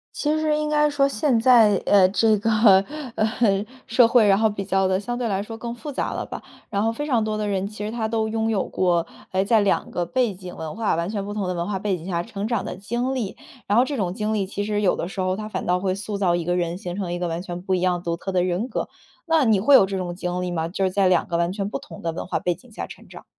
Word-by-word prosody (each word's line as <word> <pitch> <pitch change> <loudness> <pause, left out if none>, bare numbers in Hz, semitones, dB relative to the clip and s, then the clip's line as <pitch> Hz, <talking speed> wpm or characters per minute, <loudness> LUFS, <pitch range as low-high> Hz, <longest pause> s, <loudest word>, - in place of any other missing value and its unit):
其 300 +1 0
实 310 -1 +1
应 305 0 -1
该 300 0 +3
说 285 -1 +2
现 255 -1 +1
在， 225 -4 +6
呃， 190 -2 +5
这 215 +2 +3
个， 225 - 0 0.7
呃， 215 -2 +1 0.2
社 230 +1 +5
会， 235 -1 +5
然 195 -1 +5
后 220 +1 +3
比 200 -2 -5
较 195 0 +2
地 185 0 +1
相 240 +4 -4
对 245 -1 -1
来 200 -2 -1
说 225 +2 -8
更 235 +1 -5
复 290 +5 -7
杂 - - -2
了 - - -3
吧。 - - -7 0.3
然 200 -1 0
后 225 - +2
非 295 +6 -4
常 245 -7 +1
多 215 0 -2
的 210 -1 -2
人， 195 -1 -1
其 210 0 -6
实 215 - -3
他 225 -1 -2
都 220 0 0
拥 225 0 -1
有 205 -4 0
过， 175 -2 +1 0.3
哎， 190 0 +1
在 220 +2 +4
2 200 - 0
个 175 - -1
背 250 0 0
景 180 -1 -10
文 160 +1 -6
化 220 -5 0
完 170 +1 -1
全 205 -2 -3
不 205 +1 -5
同 200 -3 -2
的 180 - -1
文 170 -1 -3
化 205 -2 -1
背 200 0 -1
景 170 +1 -10
下 170 -2 -1
成 205 -1 -5
长 230 -4 -1
的 - - -5
经 235 +7 -2
历。 230 -7 -3 0.3
然 205 - +2
后 245 - +5
这 285 - -3
种 190 -8 -1
经 215 +2 -2
历 200 -3 0
其 200 +1 -3
实 210 0 -1
有 195 - +3
的 - - -3
时 195 - -8
候， 185 0 0
它 215 +1 -5
反 215 - -4
倒 180 +1 +2
会 185 0 0
塑 200 +1 -4
造 185 -3 +2
一 175 - -1
个 175 +1 0
人， 175 0 -1
形 175 -1 -5
成 185 -3 -3
一 175 - -3
个 175 - -1
完 165 +1 -3
全 175 -1 -6
不 190 0 0
一 180 - -1
样 180 -1 +1
独 170 -1 -2
特 195 +3 -5
的 180 -1 +2
人 185 +6 -1
格。 - - -3 0.4
那 320 -4 +3
你 215 -3 +4
会 270 +8 +6
有 200 - +7
这 195 0 -3
种 175 -1 -4
经 180 0 -3
历 180 - -2
吗？ 165 -2 -2
就 190 +3 -3
是 190 - +3
在 195 0 +2
2 180 -2 +2
个 170 - -1
完 170 +1 +1
全 200 0 -3
不 275 - -3
同 280 - -12
的 165 - -2
文 160 - -5
化 - - -2
背 175 -1 -1
景 235 +8 -20
下 - - -6
成 - - -13
长。 - - -12
200 Hz, 315 characters per minute, -23 LUFS, 180-225 Hz, 0.7 s, 有